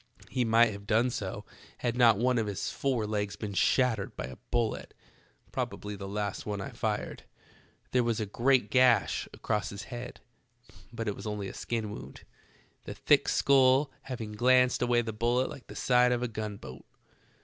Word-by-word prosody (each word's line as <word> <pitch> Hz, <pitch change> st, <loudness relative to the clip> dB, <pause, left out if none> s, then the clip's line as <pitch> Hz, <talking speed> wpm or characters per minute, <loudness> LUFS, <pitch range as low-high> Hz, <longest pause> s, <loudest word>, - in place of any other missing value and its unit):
He 125 Hz, -1 st, +1 dB
might 115 Hz, 0 st, +4 dB
have 100 Hz, 0 st, -9 dB
done 115 Hz, +3 st, +3 dB
so -, -, -5 dB, 0.3 s
had 120 Hz, -1 st, -2 dB
not 120 Hz, -4 st, +5 dB
one 125 Hz, +2 st, +2 dB
of 110 Hz, -, -1 dB
his 100 Hz, -2 st, -3 dB
fore 130 Hz, -5 st, -1 dB
legs 105 Hz, -1 st, -2 dB
been 105 Hz, -2 st, -5 dB
shattered 115 Hz, 0 st, +1 dB
by -, -, -5 dB
a 65 Hz, 0 st, -9 dB
bullet, 120 Hz, -2 st, -1 dB, 0.6 s
probably 105 Hz, 0 st, -4 dB
the 100 Hz, 0 st, -7 dB
last 100 Hz, 0 st, -3 dB
one 105 Hz, -1 st, -4 dB
I 95 Hz, -, -5 dB
fired. -, -, -3 dB, 0.7 s
There 125 Hz, -1 st, +3 dB
was 115 Hz, -1 st, 0 dB
a 110 Hz, -, -1 dB
great 120 Hz, +1 st, +2 dB
gash 125 Hz, -2 st, +3 dB
across 105 Hz, -1 st, -2 dB
his 100 Hz, +1 st, -7 dB
head, 120 Hz, +1 st, -7 dB, 0.7 s
but 115 Hz, -1 st, -5 dB
it 105 Hz, -, -1 dB
was -, -, -8 dB
only 105 Hz, -2 st, -3 dB
a -, -, -9 dB
skin 110 Hz, -3 st, -3 dB
wound, -, -, -9 dB, 0.6 s
the -, -, -6 dB
thick -, -, +3 dB
skull 135 Hz, +1 st, +4 dB
hav 130 Hz, -2 st, -6 dB
ing 110 Hz, -2 st, -5 dB
glanced 125 Hz, +3 st, +3 dB
away 120 Hz, -1 st, +2 dB
the 110 Hz, -1 st, -4 dB
bullet 120 Hz, +4 st, +1 dB
like 130 Hz, -, -11 dB
the -, -, -10 dB
side 125 Hz, -1 st, +3 dB
of 120 Hz, 0 st, 0 dB
a -, -, 0 dB
gun 110 Hz, -2 st, -5 dB
boat. 65 Hz, -7 st, -10 dB
115 Hz, 185 wpm, -29 LUFS, 105-125 Hz, 0.7 s, not